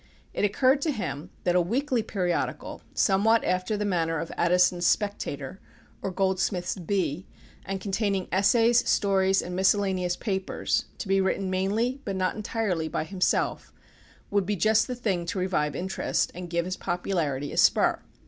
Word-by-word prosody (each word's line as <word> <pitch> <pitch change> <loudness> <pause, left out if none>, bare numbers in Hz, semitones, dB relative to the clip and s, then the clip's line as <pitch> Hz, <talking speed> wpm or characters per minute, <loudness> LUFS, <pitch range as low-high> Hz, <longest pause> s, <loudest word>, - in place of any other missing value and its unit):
It - - -2
occurred 255 +7 +3
to 310 - +1
him 180 - -4
that 175 -1 +1
a 180 - +5
weekly 245 +7 0
periodical, 185 -5 -2
somewhat 220 +3 +3
after 185 +3 0
the 210 - -1
manner 165 -4 0
of 165 +1 -4
Addison's 175 0 +3
Spectator 190 -7 -1 0.4
or - - -2
Goldsmith's 190 -1 0
Bee, 180 -2 -2 0.4
and 195 0 -3
containing 195 -1 -1
essays, 230 +5 +3
stories, 195 -1 +2
and 180 +1 -5
miscellaneous 190 -2 +1
papers, 190 -3 -1
to - - -6
be 195 0 +3
written 190 0 -1
mainly, 220 +8 0
but 195 - -3
not 185 -1 0
entirely, 205 -6 -2
by 155 - -2
himself, 185 +3 -1 0.6
would 200 -2 +1
be 210 - 0
just 215 +3 +3
the 250 - -3
thing 195 -8 -2
to 180 - -3
revive 160 -6 0
interest, 185 +4 -1
and 180 0 -7
give 170 0 0
his 185 +1 -4
popularity 170 -6 -2
a - - -6
spur. - - +4
190 Hz, 160 wpm, -27 LUFS, 180-205 Hz, 0.6 s, a